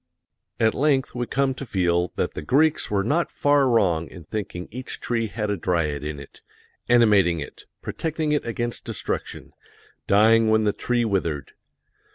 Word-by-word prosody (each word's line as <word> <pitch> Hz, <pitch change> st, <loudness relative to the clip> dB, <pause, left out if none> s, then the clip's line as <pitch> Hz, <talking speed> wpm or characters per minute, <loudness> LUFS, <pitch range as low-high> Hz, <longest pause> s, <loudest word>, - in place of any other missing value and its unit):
At 110 Hz, -1 st, +3 dB
length 135 Hz, -2 st, +1 dB
we 120 Hz, -1 st, -3 dB
come 135 Hz, 0 st, +1 dB
to 130 Hz, -, -7 dB
feel 90 Hz, -6 st, 0 dB
that -, -, -1 dB
the -, -, -5 dB
Greeks 150 Hz, -, +2 dB
were 100 Hz, -1 st, +1 dB
not 155 Hz, +10 st, +1 dB
far 145 Hz, -2 st, +2 dB
wrong 90 Hz, -9 st, +2 dB
in 90 Hz, -, -11 dB
thinking 90 Hz, 0 st, -5 dB
each 130 Hz, +3 st, -7 dB
tree 115 Hz, -2 st, -1 dB
had 105 Hz, 0 st, -3 dB
a -, -, 0 dB
dryad 80 Hz, -5 st, -1 dB
in 75 Hz, -1 st, -5 dB
it, 70 Hz, -, -13 dB, 0.5 s
animating 105 Hz, -8 st, +4 dB
it, 70 Hz, -, -9 dB, 0.2 s
protecting 160 Hz, -1 st, -2 dB
it 150 Hz, -, +1 dB
against 120 Hz, +1 st, -3 dB
destruction, -, -, -5 dB, 0.5 s
dying 110 Hz, +2 st, +5 dB
when 110 Hz, 0 st, +3 dB
the 105 Hz, -1 st, +1 dB
tree 120 Hz, -1 st, 0 dB
withered. 85 Hz, -9 st, -2 dB
110 Hz, 165 wpm, -24 LUFS, 90-125 Hz, 0.5 s, dying